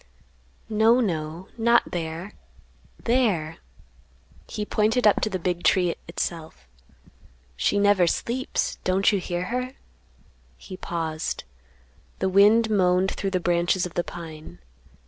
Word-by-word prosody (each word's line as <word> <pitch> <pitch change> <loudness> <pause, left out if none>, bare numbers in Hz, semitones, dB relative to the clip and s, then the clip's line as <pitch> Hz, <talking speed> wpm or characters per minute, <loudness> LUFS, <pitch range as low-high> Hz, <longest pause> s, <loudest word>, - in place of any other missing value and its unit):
"No, 225 +2 +4
no, 170 -4 -3
not 235 +1 +3
there; 170 +3 -4 0.7
there!" 205 -11 +1 0.9
He 210 - -4
pointed 220 +4 +1
up 210 - +5
to 215 - 0
the 190 - -2
big 175 0 -2
tree, 180 -3 +3
itself. 160 - -5 0.9
"She 60 - +1
never 200 -3 +4
sleeps; 250 +9 -2
don't 190 +2 +3
you 200 - +1
hear 175 -1 -3
her?" 250 +1 -2 0.8
He 185 - -10
paused. 165 -3 -4 0.7
The 190 - 0
wind 210 +4 +5
moaned 185 -1 +3
through 195 - -3
the 185 -1 0
branches 175 +1 +1
of 180 - -7
the 175 - 0
pine. 155 - -9
185 Hz, 125 wpm, -25 LUFS, 170-210 Hz, 0.9 s, up